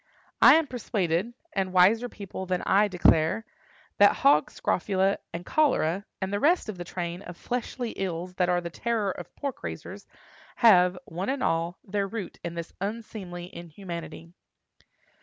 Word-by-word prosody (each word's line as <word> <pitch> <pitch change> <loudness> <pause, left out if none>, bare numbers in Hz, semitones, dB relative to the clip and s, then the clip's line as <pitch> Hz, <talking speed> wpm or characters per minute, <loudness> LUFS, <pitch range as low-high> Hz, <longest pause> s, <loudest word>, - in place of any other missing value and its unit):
I - - +9
am 325 0 +3
persuaded—and 205 - -2
wiser 215 +7 +5
people 195 -3 -7
than 180 -1 -1
I 205 +2 +4
declare—that 185 +3 +2
hog 150 +2 +4
scrofula 190 +2 0
and 175 +1 -6
cholera, 205 - +1
and 190 +1 -3
the 205 - +1
rest 320 - +3
of 195 -4 -6
the - - -3
train 175 0 -5
of 175 -3 -10
fleshly 245 -1 -3
ills 180 -1 -4
that 180 -1 +2
are 175 0 +2
the 170 -1 -6
terror 225 -1 -1
of - - -9
pork 280 -2 -5
raisers, - - -7 0.5
have, 180 -5 +5
one 180 +7 -4
and 270 0 -1
all, 165 +2 0
their 200 0 -1
root 210 -2 -6
in 170 0 -5
this 170 0 -6
unseemly 195 -4 -6
inhumanity. 170 -1 -8
190 Hz, 150 wpm, -27 LUFS, 175-220 Hz, 0.5 s, I